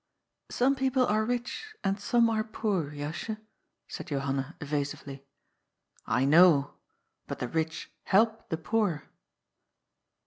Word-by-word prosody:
^^ -, -, -15 dB
Some 265 Hz, +3 st, +2 dB
people 265 Hz, -1 st, +2 dB
are 215 Hz, 0 st, +2 dB
rich 245 Hz, -, -3 dB
and 195 Hz, +1 st, 0 dB
some 235 Hz, +3 st, +3 dB
are 215 Hz, -1 st, +1 dB
poor, 205 Hz, -7 st, -1 dB
Jasje," 150 Hz, +9 st, -4 dB, 0.5 s
said -, -, -7 dB
Johanna 140 Hz, +1 st, -2 dB
evasively. 145 Hz, -2 st, -4 dB, 0.5 s
" -, -, -37 dB, 0.2 s
I -, -, +3 dB
know. 150 Hz, -1 st, +6 dB, 0.5 s
But -, -, -4 dB
the 125 Hz, -, -3 dB
rich 160 Hz, +4 st, -3 dB
help 220 Hz, +3 st, +2 dB
the 160 Hz, -, -1 dB
poor." 180 Hz, -3 st, 0 dB
180 Hz, 130 wpm, -29 LUFS, 145-225 Hz, 0.5 s, know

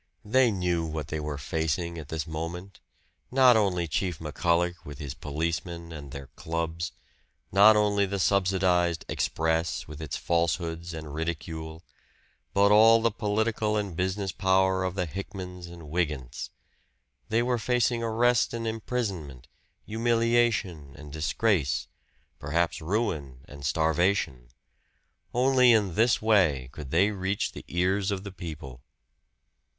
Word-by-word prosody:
They 125 Hz, +3 st, +4 dB
knew 90 Hz, -4 st, 0 dB
what 80 Hz, -2 st, -4 dB
they 80 Hz, -, -2 dB
were 75 Hz, -1 st, -4 dB
facing 80 Hz, +2 st, -2 dB
at 75 Hz, -, -9 dB
this 80 Hz, -2 st, -3 dB
moment; 85 Hz, +4 st, -6 dB, 0.5 s
not 130 Hz, -2 st, +6 dB
only 95 Hz, -5 st, +1 dB
Chief 90 Hz, +1 st, -1 dB
McCullagh 85 Hz, +3 st, 0 dB
with 75 Hz, -2 st, -9 dB
his 70 Hz, -2 st, -5 dB
policemen 85 Hz, +3 st, -4 dB
and 75 Hz, -3 st, -8 dB
their 70 Hz, +1 st, -8 dB
clubs; 85 Hz, 0 st, -3 dB, 0.6 s
not 105 Hz, +3 st, +7 dB
only 105 Hz, -1 st, +2 dB
the 100 Hz, +1 st, -2 dB
subsidized 90 Hz, -3 st, +2 dB
"Express" 80 Hz, +1 st, -1 dB
with 75 Hz, +1 st, -9 dB
its 75 Hz, -4 st, -4 dB
falsehoods 85 Hz, 0 st, -1 dB
and 80 Hz, -2 st, -7 dB
ridicule: 80 Hz, 0 st, -5 dB, 0.7 s
but 100 Hz, +1 st, +4 dB
all 110 Hz, +2 st, +7 dB
the 115 Hz, 0 st, +2 dB
political 110 Hz, 0 st, 0 dB
and 100 Hz, -5 st, -3 dB
business 95 Hz, +2 st, -1 dB
power 95 Hz, 0 st, +2 dB
of 95 Hz, 0 st, -2 dB
the 90 Hz, -2 st, 0 dB
Hickmans 90 Hz, 0 st, -7 dB
and 85 Hz, -1 st, -11 dB
Wygants. 75 Hz, -7 st, -3 dB, 0.8 s
They 115 Hz, +2 st, +2 dB
were 125 Hz, -1 st, 0 dB
facing 120 Hz, 0 st, +1 dB
arrest 115 Hz, +1 st, +2 dB
and 115 Hz, 0 st, -4 dB
imprisonment, 100 Hz, -, -4 dB, 0.4 s
humiliation 115 Hz, -9 st, +1 dB
and 75 Hz, -1 st, -11 dB
disgrace 80 Hz, 0 st, +1 dB, 0.5 s
perhaps 80 Hz, +4 st, 0 dB
ruin 80 Hz, -, -2 dB
and 70 Hz, -1 st, -12 dB
starvation. 80 Hz, -3 st, +1 dB, 0.8 s
Only 125 Hz, 0 st, +5 dB
in 105 Hz, -6 st, +3 dB
this 115 Hz, +4 st, +2 dB
way 85 Hz, -, +3 dB
could 75 Hz, -2 st, -8 dB
they 95 Hz, +8 st, +3 dB
reach 100 Hz, 0 st, -2 dB
the -, -, -10 dB
ears 95 Hz, +3 st, +1 dB
of 100 Hz, -2 st, -2 dB
the 100 Hz, -, -7 dB
people. 75 Hz, -9 st, -8 dB
90 Hz, 135 wpm, -27 LUFS, 80-105 Hz, 0.8 s, not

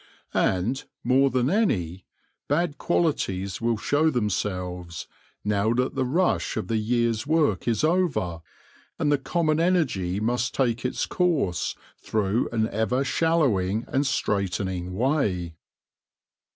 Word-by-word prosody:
And, 115 Hz, +10 st, +1 dB, 0.2 s
more 135 Hz, +2 st, +4 dB
than 125 Hz, -1 st, +1 dB
any, 95 Hz, -, 0 dB, 0.4 s
bad 155 Hz, +1 st, 0 dB
qualities 100 Hz, -, 0 dB
will 115 Hz, -1 st, +1 dB
show 145 Hz, +8 st, +2 dB
themselves, 90 Hz, -, -2 dB, 0.4 s
now 105 Hz, +2 st, +1 dB
that 125 Hz, +1 st, 0 dB
the 135 Hz, -2 st, 0 dB
rush 170 Hz, +9 st, +1 dB
of -, -, -3 dB
the 115 Hz, -, +1 dB
year's 115 Hz, +1 st, 0 dB
work 150 Hz, -, +1 dB
is 115 Hz, +1 st, +1 dB
over, 155 Hz, -, +1 dB, 0.6 s
and 145 Hz, -, +1 dB
the 145 Hz, -, +3 dB
common 155 Hz, +1 st, 0 dB
energy 130 Hz, -, +1 dB
must 120 Hz, +3 st, -1 dB
take 120 Hz, -3 st, +1 dB
its 125 Hz, -, -1 dB
course 155 Hz, -, 0 dB, 0.2 s
through 105 Hz, +2 st, 0 dB
an 110 Hz, -2 st, +1 dB
ever 110 Hz, +5 st, 0 dB
shallowing 120 Hz, -, +1 dB
and 135 Hz, -, +1 dB
straitening 95 Hz, -7 st, -1 dB
way. 100 Hz, -, 0 dB
120 Hz, 125 wpm, -25 LUFS, 95-145 Hz, 0.6 s, more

